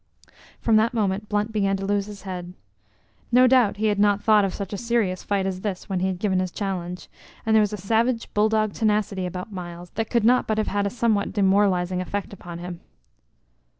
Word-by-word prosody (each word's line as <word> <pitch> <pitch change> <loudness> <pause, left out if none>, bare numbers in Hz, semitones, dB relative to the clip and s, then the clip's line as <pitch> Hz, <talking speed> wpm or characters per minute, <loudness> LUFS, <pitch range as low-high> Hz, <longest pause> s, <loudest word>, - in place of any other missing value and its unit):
From 225 -2 +3
that 230 +3 +2
moment 205 -1 -1
Blunt 210 +1 0
began 195 -2 +1
to 195 - -4
lose 200 0 0
his 205 -1 -10
head. 180 -2 -6 0.8
No 250 +1 +6
doubt 250 -5 +4
he 215 - -1
had 205 -1 +1
not 205 0 +4
thought 215 -2 +5
of 195 - 0
such 200 +1 -6
a - - -2
serious 230 -6 0
fight 200 -2 -1
as 185 -1 -3
this 195 -2 -4
when 190 -2 -1
he 185 - +1
had 190 -1 -2
given 190 -1 0
his 185 0 -1
challenge, 180 -2 -4 0.4
and 220 0 +3
there 220 - +6
was 210 - +1
a 210 - -4
savage 230 +5 0
bull 210 +1 +3
dog 215 -1 +1
tenacity 210 -4 0
about 180 +4 -6
Myles 175 -2 -8
that 225 -1 -3
could 235 -3 +1
not 250 +2 +4
but 215 - 0
have 215 - 0
had 200 0 0
a - - -1
somewhat 220 -4 0
demoralizing 190 -2 +2
effect 200 +2 -4
upon 175 -3 -9
him. 175 0 -7
200 Hz, 215 wpm, -24 LUFS, 185-215 Hz, 0.8 s, No